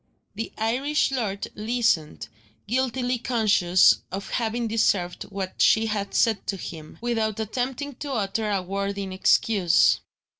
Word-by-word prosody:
The 225 Hz, +2 st, -5 dB
Irish 270 Hz, +7 st, +1 dB
lord 215 Hz, -7 st, -2 dB
listened 215 Hz, -8 st, 0 dB, 0.4 s
guiltily 250 Hz, 0 st, -1 dB
conscious 210 Hz, -7 st, +4 dB
of 195 Hz, +2 st, -5 dB
having 235 Hz, 0 st, -1 dB
deserved 200 Hz, -5 st, 0 dB
what 195 Hz, -2 st, -5 dB
she 220 Hz, 0 st, +5 dB
had 205 Hz, -2 st, -3 dB
said 220 Hz, -3 st, +2 dB
to 195 Hz, -, -2 dB
him 160 Hz, -4 st, -9 dB
without 225 Hz, -3 st, -1 dB
attempting 255 Hz, +6 st, -3 dB
to 285 Hz, -2 st, -5 dB
utter 215 Hz, -1 st, -1 dB
a 195 Hz, -3 st, 0 dB
word 200 Hz, +2 st, -3 dB
in 195 Hz, -1 st, -4 dB
excuse. 185 Hz, -2 st, +3 dB
220 Hz, 135 wpm, -25 LUFS, 195-240 Hz, 0.4 s, she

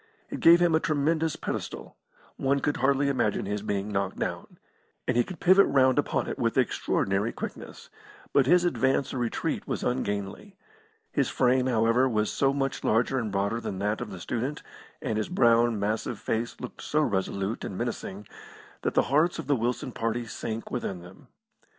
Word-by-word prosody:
It -, -, -4 dB
gave 170 Hz, +1 st, +7 dB
him 175 Hz, -2 st, +3 dB
a 160 Hz, -, +4 dB
tremendous 160 Hz, -1 st, 0 dB
pedestal; -, -, -5 dB, 0.4 s
one 140 Hz, +1 st, +1 dB
could 145 Hz, +2 st, -1 dB
hardly 140 Hz, +1 st, +2 dB
imagine 120 Hz, -7 st, 0 dB
his 105 Hz, +1 st, -2 dB
being 100 Hz, 0 st, -2 dB
knocked 100 Hz, -1 st, -1 dB
down. -, -, -4 dB, 0.5 s
And 125 Hz, -, +1 dB
he 120 Hz, -, +4 dB
could 185 Hz, +3 st, -9 dB
pivot 190 Hz, +2 st, +6 dB
round 130 Hz, -2 st, +4 dB
upon -, -, 0 dB
it -, -, -5 dB
with -, -, 0 dB
extraordinary 100 Hz, +4 st, +1 dB
quickness; -, -, -8 dB, 0.4 s
but 135 Hz, -2 st, +4 dB
his 175 Hz, +3 st, +5 dB
advance 135 Hz, -5 st, +1 dB
or 130 Hz, -, -2 dB
retreat 120 Hz, -2 st, -2 dB
was -, -, -3 dB
ungainly. 115 Hz, -, -3 dB, 0.5 s
His -, -, +1 dB
frame, 130 Hz, 0 st, +2 dB
however, 120 Hz, +2 st, +3 dB
was 105 Hz, -2 st, 0 dB
so 135 Hz, -1 st, +2 dB
much 135 Hz, -1 st, -2 dB
larger 120 Hz, +4 st, +2 dB
and 110 Hz, -4 st, -3 dB
broader 100 Hz, +4 st, -1 dB
than 95 Hz, -, -4 dB
that 105 Hz, +3 st, -1 dB
of 120 Hz, -, -5 dB
the 95 Hz, -3 st, -8 dB
student, 125 Hz, -, -3 dB, 0.4 s
and 110 Hz, -1 st, -1 dB
his 110 Hz, -, -2 dB
brown, 120 Hz, -, +3 dB
massive 110 Hz, +2 st, -2 dB
face 115 Hz, +3 st, -3 dB
looked -, -, -8 dB
so 150 Hz, -, 0 dB
resolute 100 Hz, -2 st, -2 dB
and 95 Hz, -, -5 dB
menacing 105 Hz, -4 st, -4 dB, 0.6 s
that -, -, -2 dB
the -, -, +5 dB
hearts 160 Hz, +4 st, +3 dB
of 165 Hz, -, -5 dB
the 145 Hz, +1 st, +2 dB
Wilson 125 Hz, +2 st, -2 dB
party 115 Hz, +1 st, -2 dB
sank 115 Hz, 0 st, -5 dB
within 100 Hz, -7 st, -3 dB
them. 90 Hz, +2 st, -15 dB
120 Hz, 180 wpm, -27 LUFS, 105-140 Hz, 0.6 s, gave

